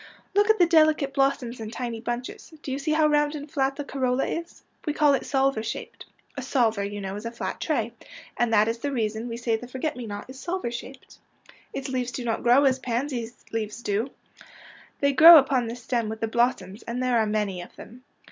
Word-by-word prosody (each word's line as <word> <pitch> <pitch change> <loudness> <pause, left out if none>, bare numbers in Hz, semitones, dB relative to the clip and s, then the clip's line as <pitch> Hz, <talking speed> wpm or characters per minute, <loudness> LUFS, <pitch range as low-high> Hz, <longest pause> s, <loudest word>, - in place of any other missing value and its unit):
'' - - -34
Look 410 +2 +3
at 440 - +5
the 355 - +6
delicate 310 -4 +3
blossoms 270 -3 0
in 220 -1 -5
tiny 235 -1 -5
bunches. 240 +6 -5
Do 270 - -5
you 270 - -2
see 305 +2 -1
how 310 0 +3
round 295 0 +2
and 290 0 -8
flat 270 -1 0
the 290 - -4
corolla 265 -2 0
is? 335 +1 -5 0.2
We 300 - -1
call 295 -2 +4
it 275 - -1
salver 270 -4 +1
shaped. 225 - -7 0.3
A - - -4
salver, 225 -6 +1
you 205 +1 -4
know, 195 -1 -5
is 210 - -8
a - - -5
flat 235 - -5
tray 235 -8 -1 0.2
— - - -17
and 240 -1 +1
that 215 -1 +4
is 230 +1 -2
the 285 +3 -3
reason 220 -2 -2
we 230 -1 -5
say 235 -1 0
the 245 - -10
forget 260 +5 -3
me 245 -2 -7
not 205 -1 -6
is 260 +1 -11
salver 345 -6 -3
shaped. 255 +2 -9 0.3
'' - - -25
Its 275 - -4
leaves 255 -2 -2
do 240 +1 -5
not 225 -1 -1
grow 245 +3 +5
as 265 -1 +3
pansy 245 -1 -2 0.2
leaves 225 +1 -4
do. 210 +6 -1 0.9
They 280 0 +3
grow 325 +4 +11
upon 265 -4 +2
the 230 - -4
stem 235 -2 -2
with 220 0 -5
the 225 - -1
blos 240 +3 +2
soms, 190 +3 -12
and 245 +2 -2
there 250 -2 +2
are 220 - +1
many 210 -4 -1
of 175 - -12
them. 250 +3 -13
250 Hz, 235 wpm, -25 LUFS, 225-275 Hz, 0.9 s, grow